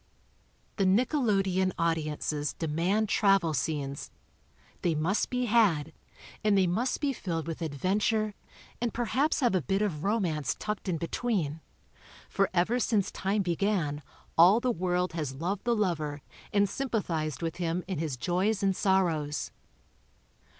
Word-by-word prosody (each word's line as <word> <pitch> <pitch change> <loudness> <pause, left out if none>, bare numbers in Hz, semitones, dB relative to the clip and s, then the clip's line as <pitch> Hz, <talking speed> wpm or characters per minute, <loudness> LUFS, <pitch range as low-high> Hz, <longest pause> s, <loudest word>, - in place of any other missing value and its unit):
The 200 - +2
nickelodeon 195 - +2
audiences 155 -2 -1
demand 175 +7 0
travel 195 -6 +3
scenes. 140 -1 -2 0.7
They 170 -3 +1
must 165 +7 0
be 250 0 0
had, 210 - +3 0.5
And 210 -2 +4
they 190 - +4
must 225 +9 0
be 280 -2 0
filled 165 -8 -3
with 165 +1 -5
adventure 205 +8 0 0.5
and 240 -1 -1
perhaps 265 +7 +1
have 245 -4 +3
a 185 - +2
bit 195 +9 0
of 165 -7 -2
romance 170 - 0
tucked 210 -2 -4
in 170 - 0
between 170 -3 -2 0.3
— - - -22
for 195 -1 +2
ever 190 +7 +2
since 215 -4 +1
time 200 +2 0
began 170 -4 0 0.4
all 185 +7 +8
the 250 +1 +1
world 180 -2 -1
has 150 -5 -3
loved 180 - -3
the 240 -1 +2
lover 155 -8 -1 0.3
and 200 0 +3
sympathized 180 - -2
with 165 +1 -3
him 175 0 -1
in 185 -5 -3
his 155 -5 -2
joys 190 - 0
and 195 -1 +2
sorrows. 170 -7 +1
185 Hz, 145 wpm, -29 LUFS, 160-210 Hz, 0.7 s, all